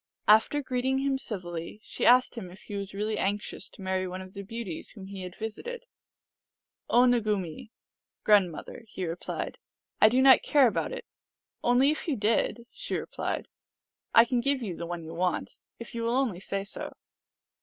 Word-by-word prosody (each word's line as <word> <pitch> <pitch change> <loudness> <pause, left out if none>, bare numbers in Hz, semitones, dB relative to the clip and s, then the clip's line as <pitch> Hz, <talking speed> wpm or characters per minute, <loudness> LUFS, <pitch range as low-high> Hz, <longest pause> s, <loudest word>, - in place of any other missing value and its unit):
After 220 +7 +5
greeting 260 +1 0
him 270 0 0
civilly, 175 -6 -5
she - - -1
asked 250 +1 +6
him 210 -7 -7
if 185 +3 -13
he - - -9
was 200 0 -4
really 210 +1 -1
anxious 205 +2 -2
to 195 - -12
marry 185 0 0
one 185 +1 -5
of 185 0 -10
the 200 - -6
beauties 200 -4 -5
whom 200 -4 -9
he 195 0 -7
had 180 -1 -7
visited. 470 - -5 0.5
" - - -56
O 245 +1 +6
Nugumee 210 -7 0 0.3
" - - -64
(grandmother), 200 -1 +2
he 190 -3 -4
replied, 165 +1 -4 0.2
" - - -43
I 215 - +9
do 250 +3 +2
not 265 0 +8
care 285 -3 +5
about 235 - 0
it." - - -6 0.3
" - - -53
Only 250 +4 +5
if 310 - -4
you 300 - +1
did," 230 +2 +1
she - - -4
replied, - - -3 0.4
" - - -17
I 230 - +9
can 245 0 0
give 275 -1 +1
you 190 -6 -3
the 170 - -5
one 175 -1 -5
you 160 +1 -8
want, 180 +1 -2 0.2
if 235 - -9
you 235 - -3
will 230 +1 +1
only 250 -9 +1
say 195 +1 -3
so." 200 - -7
215 Hz, 195 wpm, -28 LUFS, 185-250 Hz, 0.5 s, I